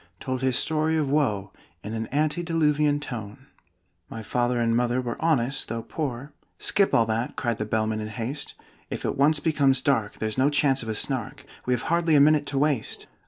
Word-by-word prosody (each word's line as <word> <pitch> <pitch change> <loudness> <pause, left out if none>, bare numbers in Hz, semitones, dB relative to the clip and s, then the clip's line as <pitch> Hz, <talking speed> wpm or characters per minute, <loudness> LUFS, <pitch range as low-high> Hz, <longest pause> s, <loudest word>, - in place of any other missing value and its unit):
told 130 -1 -3
his 130 -1 +1
story 160 0 +1
of 150 -3 0
woe 110 -10 0 0.3
In 105 - -5
an 110 0 -3
antediluvian 150 -1 +1
tone. 120 -2 -7 0.6
"My 110 - -7
father 120 +2 0
and 115 -1 +2
mother 120 +1 +1
were 120 -2 -3
honest, 135 -5 +1
though 115 0 -3
poor 140 +1 -4
" - - -45
"Skip 200 -1 +3
all 115 - +4
that!" 110 +2 -2
cried 120 -3 -2
the 110 - -1
Bellman 110 0 0
in 105 - -4
haste. 115 +7 -5 0.3
"If - - -5
it - - -1
once 150 +2 +3
becomes 140 -4 +2
dark, 125 -6 0
there's 110 +2 -2
no 135 +2 +4
chance 135 -2 +2
of 115 - -6
a 110 - -2
Snark 130 -1 -3 0.2
We 125 - +3
have 120 - -5
hardly 170 -1 +2
a - - +7
minute 150 0 +4
to 140 - -2
waste!" 140 -4 0
130 Hz, 200 wpm, -25 LUFS, 115-150 Hz, 0.6 s, a